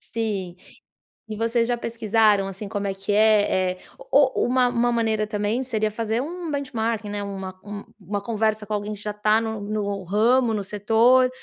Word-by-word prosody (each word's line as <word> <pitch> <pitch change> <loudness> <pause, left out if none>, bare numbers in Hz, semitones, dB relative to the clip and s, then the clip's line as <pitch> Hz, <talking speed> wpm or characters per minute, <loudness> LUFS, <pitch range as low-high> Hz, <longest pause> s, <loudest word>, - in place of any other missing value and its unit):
Sim. 200 -6 -4 0.7
E 215 - -5
vocês 230 +1 +1
já 245 - +1
pesquisaram, 220 -3 +2
assim, 195 +2 -7
como 205 -1 -3
é 195 - -2
que 195 +1 -6
é, 205 -3 +3
eh, 185 - -12 0.3
o 270 -2 +4
o - - +1
uma 250 0 +3
uma 240 0 +1
maneira 220 -2 0
também, 210 +4 -1
seria 215 -4 -1
fazer 225 +2 -2
um 340 +2 -5
benchmarking, 230 -6 -2
né, 205 0 -3
uma 190 -2 -6
um 205 0 -7 0.2
uma 200 +2 -4
conversa 220 -1 0
com 215 - -6
alguém 210 +1 -3
que 205 - -12
já 210 - -3
está 210 +1 +2
no 220 -1 -4
no 205 -1 -3
ramo, 225 +5 +3
no 205 - -1
setor, 225 +6 +4
215 Hz, 190 wpm, -23 LUFS, 205-230 Hz, 0.7 s, o